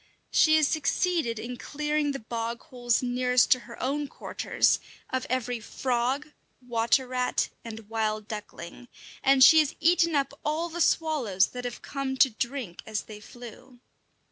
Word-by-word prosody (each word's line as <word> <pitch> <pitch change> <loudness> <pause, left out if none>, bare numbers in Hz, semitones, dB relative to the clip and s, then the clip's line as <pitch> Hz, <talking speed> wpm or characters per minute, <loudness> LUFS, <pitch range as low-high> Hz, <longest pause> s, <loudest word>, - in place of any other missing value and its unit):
She 310 0 +5
has 310 -2 +4
succeeded 315 -4 0
in 245 +3 -6
clearing 300 +1 -1
the 275 - -3
bog 230 0 -5
holes 245 -5 -1
nearest 250 0 +2
to 255 - +6
her 235 - -10
own 285 +3 -1
quarters - - 0 0.3
of 260 0 -2
every 245 -1 -1
frog, 255 +5 -1 0.3
water 240 +1 +1
rat, 250 0 0
and 225 -2 -9
wild 215 -1 -2
duckling; 210 +1 -8 0.4
and 270 -1 +6
she 320 +3 +9
has 300 -2 +1
eaten 335 -1 +3
up 275 -1 0
all 315 +3 -1
the 345 +1 -4
swallows 265 - +2
that 250 0 -7
have 245 - -6
come 275 -2 -4
to 265 -1 +5
drink 235 -4 -4
as 215 -1 -3
they 210 -1 -11
flew. 245 +3 -13
250 Hz, 155 wpm, -27 LUFS, 230-290 Hz, 0.4 s, she